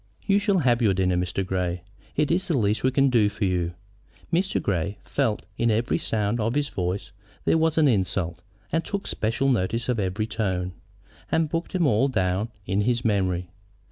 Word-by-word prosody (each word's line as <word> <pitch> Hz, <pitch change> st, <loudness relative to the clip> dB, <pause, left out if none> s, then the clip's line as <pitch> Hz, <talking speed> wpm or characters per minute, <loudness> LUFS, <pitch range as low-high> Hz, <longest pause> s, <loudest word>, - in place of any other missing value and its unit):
"You 200 Hz, 0 st, +4 dB
shall 205 Hz, -1 st, +2 dB
have 125 Hz, -7 st, +3 dB
your 105 Hz, -5 st, +3 dB
dinner, 90 Hz, -1 st, +2 dB
Mr. 90 Hz, +2 st, -1 dB
Grey. 90 Hz, -1 st, -2 dB, 0.3 s
It 150 Hz, +1 st, +1 dB
is 180 Hz, +3 st, +1 dB
the 165 Hz, -6 st, +1 dB
least 105 Hz, -2 st, +1 dB
we 130 Hz, -, +4 dB
can 135 Hz, 0 st, +3 dB
do 110 Hz, -4 st, +4 dB
for 100 Hz, -, -2 dB
you." 90 Hz, -2 st, 0 dB, 0.6 s
Mr. 190 Hz, +3 st, +2 dB
Grey 100 Hz, +1 st, -1 dB
felt 110 Hz, -1 st, 0 dB
that -, -, -29 dB
in 120 Hz, -, +3 dB
every 115 Hz, +2 st, +1 dB
sound 105 Hz, +1 st, 0 dB
of 115 Hz, +3 st, 0 dB
his 145 Hz, -1 st, +1 dB
voice 90 Hz, +2 st, -3 dB, 0.3 s
there 165 Hz, -, +3 dB
was 160 Hz, 0 st, +2 dB
an 155 Hz, -2 st, +5 dB
insult, 95 Hz, -6 st, 0 dB, 0.3 s
and 165 Hz, +1 st, +1 dB
took 200 Hz, -1 st, -4 dB
special 115 Hz, +5 st, 0 dB
notice 115 Hz, 0 st, 0 dB
of 120 Hz, -3 st, +1 dB
every 100 Hz, +2 st, -1 dB
tone, 95 Hz, -5 st, -2 dB, 0.6 s
and 160 Hz, -1 st, +2 dB
booked 165 Hz, +2 st, -3 dB
them 180 Hz, -3 st, +2 dB
all 130 Hz, 0 st, +3 dB
down 100 Hz, -3 st, 0 dB, 0.2 s
in 100 Hz, +2 st, +1 dB
his 120 Hz, +2 st, 0 dB
memory. 90 Hz, -4 st, 0 dB
110 Hz, 195 wpm, -25 LUFS, 95-135 Hz, 0.6 s, an